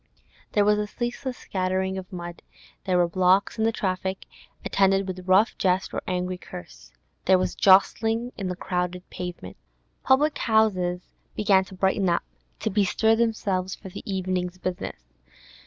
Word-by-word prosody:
There 205 -1 +4
was 210 0 +4
a 210 - -1
ceaseless 245 +3 -4
scattering 190 0 -1
of 190 0 -7
mud; 175 -1 -7 0.4
there 185 -2 +2
were 175 -1 +4
blocks 185 +5 +2
in 220 - +2
the 225 - +3
traffic, 190 -2 -2 0.4
attended 195 0 +2
with 185 0 -6
rough 195 +4 +4
jest 185 0 +1
or - - -2
angry 180 0 -2
curse; 60 - -11 0.3
there 190 - +6
was 185 -1 -1
jostling 225 +5 +3
on 195 - -2
the 180 - -3
crowded 180 0 -3
pavement. 180 -1 -7 0.5
Public 290 +3 +3
houses 185 -6 +2 0.3
began 195 -3 +3
to 190 - -12
brighten 190 0 +1
up, 170 - +1 0.4
to 220 - -1
bestir 215 +3 +3
themselves 200 -5 0
for 190 - -11
the - - -8
evening's 185 -1 -2
business. 65 - -6
190 Hz, 155 wpm, -25 LUFS, 180-210 Hz, 0.5 s, there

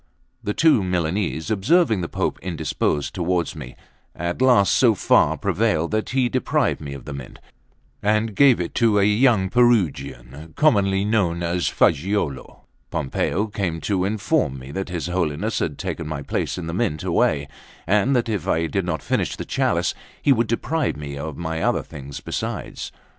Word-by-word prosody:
The 105 - -2
two 155 -10 +4
Milanese, 90 -1 -1
observing 110 - +3
the 85 - -4
Pope - - -2
indisposed 80 -4 -2
towards 85 -2 -1
me, 65 - -9 0.4
at 85 +6 -3
last 125 -7 +5
so 120 -4 +4
far - - +3
prevailed 80 +2 0
that 110 0 -1
he 130 -1 +2
deprived 120 - 0
me 70 -2 -6
of 70 - -10
the 75 - -6
Mint, 70 -3 -9 0.6
and 110 +1 +1
gave 135 -3 +5
it 85 - -3
to 110 -3 +4
a 100 - +4
young 105 -1 +3
Perugian, 80 - 0
commonly 100 -9 +3
known 90 -6 +1
as 85 +1 0
Fagiuolo. 85 -4 0 0.3
Pompeo 90 +9 -1
came 95 -6 -3
to 95 -3 0
inform 105 - 0
me 65 +1 -9
that 95 +5 -4
his 85 -2 -3
Holiness 90 +3 -1
had 75 -4 -2
taken 85 - -4
my 75 -2 -4
place - - -2
in 90 - -5
the 80 - -4
Mint 90 -6 -1
away, 70 -1 +1 0.4
and 105 +8 +2
that 120 -1 +1
if 105 -7 -2
I 85 +1 +1
did 85 +4 -1
not 80 -3 -3
finish - - -1
the - - -6
chalice, - - 0 0.3
he 140 - +4
would 115 -2 +1
deprive 130 - -1
me 70 -1 -6
of 80 +3 -6
other 80 0 0
things 70 -1 -9
besides. - - -5
90 Hz, 170 wpm, -22 LUFS, 80-110 Hz, 0.6 s, last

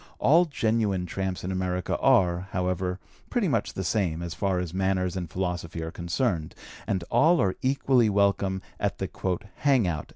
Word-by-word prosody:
All 165 +6 +5
genuine 110 - 0
tramps 95 +1 -3
in 90 - -3
America 90 -1 -1
are, 90 0 +3
however, 90 0 -1 0.3
pretty - - +1
much - - 0
the 95 - -3
same, 85 -4 0
as 85 -1 -4
far 95 -2 0
as 90 -2 -3
manners 95 -1 0
and 90 -3 -4
philosophy 90 -2 -3
are 80 - -5
concerned, 85 -1 -2 0.3
and 95 -3 -1
all 165 +3 +5
are 95 -2 +1
equally 130 -3 +3
welcome 100 -1 +1 0.2
at - - -1
the - - -2 0.5
"hang 135 -6 +3
out." 80 -3 -3
95 Hz, 165 wpm, -27 LUFS, 90-105 Hz, 0.5 s, All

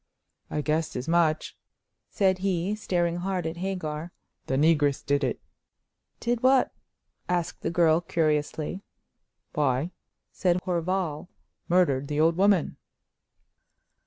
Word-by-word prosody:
"I 150 - -1
guessed 155 +3 -1
as 125 +3 -4
much," 165 -2 +1 0.5
said 190 -2 +2
he, 190 0 0
staring 175 -5 0
hard 180 -1 -2
at 160 +1 -3
Hagar. 170 -3 -4 0.4
"The 130 - 0
negress 145 -1 +3
did 145 -1 +1
it." 130 - -1 0.8
"Did 240 0 -1
what?" 260 0 +4 0.6
asked 175 -1 -1
the - - -1
girl, 165 -1 +3
curiously. 155 +1 -1 0.7
"Why," 145 +3 +1 0.4
said 180 -2 +1
Horval, 180 -2 -1 0.4
"murdered 145 -7 +3
the 150 0 -2
old 165 +1 +4
woman." 195 -2 +2
170 Hz, 115 wpm, -27 LUFS, 150-185 Hz, 0.8 s, what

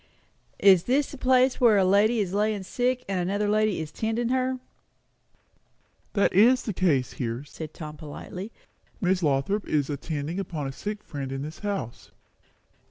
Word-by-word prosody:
"Is 190 -4 +6
this 275 +3 +1
the 280 - -8
place 255 0 +3
where 230 -4 +6
a 190 - +4
lady 210 +4 +4
is 190 -2 -3
lying 210 -1 0
sick 250 +5 -1
and 195 -2 -1
another 200 +4 0
lady 215 -2 +2
is 155 -1 -5
tendin' 225 +5 -1
her?" 260 0 0 1.6
"That 200 - +2
is 240 +7 +5
the 215 - -3
case 150 -9 +1
here," 120 +1 -3
said 155 +1 -8
Tom 155 -2 -8
politely. 180 +7 -8 0.5
"Miss 185 0 +1
Lothrop 155 +7 0
is 150 -1 0
attending 150 +4 -4
upon 170 -6 -4
a 135 - -3
sick 210 +9 -6
friend 140 -3 -6
in 135 0 -4
this 155 +2 -8
house." 195 - -4
195 Hz, 165 wpm, -26 LUFS, 155-220 Hz, 1.6 s, Is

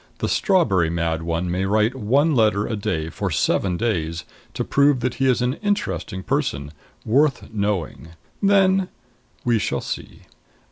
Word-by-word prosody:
The - - -2
strawberry 105 - +2
mad 85 -1 -1
one 85 +1 -2
may 90 +2 -1
write 105 +4 +2
one 135 +6 +2
letter 105 -4 +2
a 110 - -2
day 80 -6 -2
for 100 +3 -3
seven 90 +3 +1
days 85 -7 -2 0.3
to - - -1
prove 140 -2 +3
that 125 0 -1
he 135 - +4
is 125 -1 +2
an 125 +1 +1
interesting 95 - -2
person, 85 - -2 0.3
worth 135 +2 +1
knowing. 100 -6 -2 0.3
Then 195 -2 +3 0.6
we 120 -2 +3
shall - - -1
see. - - -7
110 Hz, 150 wpm, -22 LUFS, 85-135 Hz, 0.6 s, he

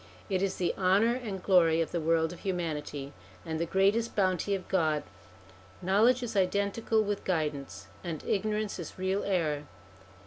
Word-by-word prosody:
It 185 -1 +1
is 195 -1 0
the 175 -2 0
honour 195 +5 +4
and 215 -7 -5
glory 165 -4 +4
of 165 - -1
the 170 - -1
world 160 +1 +2
of 175 - -11
humanity, 150 -6 -3 0.3
and 160 -1 -3
the 170 - -1
greatest 200 +6 +2
bounty 190 0 +1
of 190 - -6
God. 155 -5 +1 0.8
Knowledge 220 +7 +3
is 225 -2 -4
identical 200 +3 +1
with 205 -1 -2
guidance, 150 -6 -2 0.2
and 165 -4 -5
ignorance 210 0 -1
is 170 - -7
real 190 +2 0
error. 155 -7 0
185 Hz, 160 wpm, -30 LUFS, 165-200 Hz, 0.8 s, honour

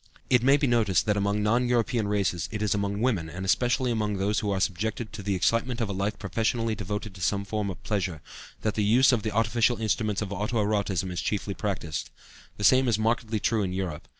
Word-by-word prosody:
It 125 -2 +5
may 135 +3 +5
be 145 - +1
noticed 115 -7 +2
that 105 -2 +2
among 100 +1 0
non 120 +4 +2
European 115 -2 +1
races 100 -5 0
it 105 0 -3
is 105 - +2
among 100 0 -1
women, 100 -11 0
and 90 +3 -6
especially 125 +5 +2
among 105 -3 -1
those 100 +2 +1
who 105 - -2
are 100 -1 0
subjected 105 +4 -2
to 105 - -6
the 100 0 -1
excitement 115 +6 +1
of 115 -3 -1
a - - -2
life 100 +3 -2
professionally 115 +3 -1
devoted 105 0 -4
to 90 - -11
some 100 +4 0
form 105 0 -2
of 95 - -8
pleasure, 95 -6 -2 0.4
that 110 - 0
the 105 - 0
use 125 +6 +5
of 120 -4 +1
the 110 - -2
artificial 115 +3 +2
instruments 110 -1 0
of 100 -1 -5
auto 105 +4 -2
erotism 100 -3 -1
is 90 - -3
chiefly 100 -1 -2
practiced. 90 - -3 0.5
The 100 - -5
same 130 +5 +5
is 115 -4 +2
markedly 110 0 0
true 110 +1 +1
in 95 -2 -2
Europe. 90 -5 -4
105 Hz, 225 wpm, -27 LUFS, 100-115 Hz, 0.5 s, It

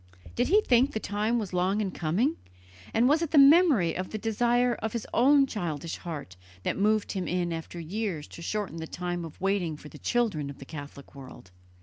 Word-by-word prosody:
Did 245 - +1
he 415 +4 +5
think 260 - +3
the 220 - -1
time 215 +3 -1
was 205 -5 -4
long 185 +3 +1
in 200 -3 -1
coming, 195 - 0 0.6
and 230 +2 +3
was 300 +4 +3
it 335 - -1
the 310 - +2
memory 280 - +6
of 185 0 -4
the 215 - -4
desire 240 +3 +1
of 220 -2 -4
his 235 -2 -3
own 275 +3 +5
childish 165 - -4
heart 145 - -7 0.3
that - - -1
moved 210 +1 +1
him 185 -4 -3
in 175 0 -1
after 165 +1 -6
years 175 -2 -4
to - - -10
shorten 205 -1 -3
the 160 0 -5
time 175 0 -4
of 165 -2 -10
waiting 185 -5 0
for 150 - -12
the - - -13
children 210 -13 0
of 140 - -9
the 135 - -11
Catholic 145 -2 -10
world? 130 -9 -12
200 Hz, 210 wpm, -28 LUFS, 165-240 Hz, 0.6 s, memory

